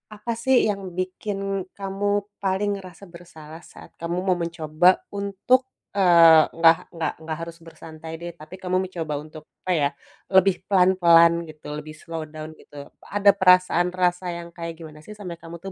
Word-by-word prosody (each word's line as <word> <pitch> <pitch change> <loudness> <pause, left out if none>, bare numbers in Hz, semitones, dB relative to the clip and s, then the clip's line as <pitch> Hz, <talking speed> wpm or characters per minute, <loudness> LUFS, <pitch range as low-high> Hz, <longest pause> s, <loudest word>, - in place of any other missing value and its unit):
apa 210 +3 -5
sih, 260 +2 +3
yang 200 -1 -2 0.2
bikin 195 +1 -3
kamu 195 +1 -3 0.4
paling 195 +2 0
ngerasa 185 +1 -12
bersalah, 165 -2 -12
saat - - -15
kamu 170 +1 -3
mau 185 -1 +2
mencoba 170 +1 +2
untuk, 200 +6 +1 0.3
eee, 170 -4 +7
nggak 165 0 +6 0.2
nggak 165 - -2
nggak 160 -1 -4
harus 165 0 -7
bersantai 160 -1 -11
deh, 175 0 -6
tapi 155 +4 -11
kamu 185 0 0
mencoba 165 -4 -5
untuk, 155 0 -12 0.2
apa 185 - 0
ya, 140 - +2 0.5
lebih 190 0 +5
pelan-pelan, 180 -3 +5 0.2
gitu, 155 -1 -13
lebih 155 +1 -8
slow 165 0 -6
down, 155 0 -9
gitu, - - -19 0.4
ada 200 0 +6
perasaan 180 -1 +4
rasa 180 0 0
yang 170 0 -9
kayak 170 -1 -6
gimana 155 -2 -11
sih 215 - -9
sampai 180 -5 -7
kamu 170 0 -9
tuh 195 - -6
175 Hz, 165 wpm, -23 LUFS, 165-190 Hz, 0.5 s, eee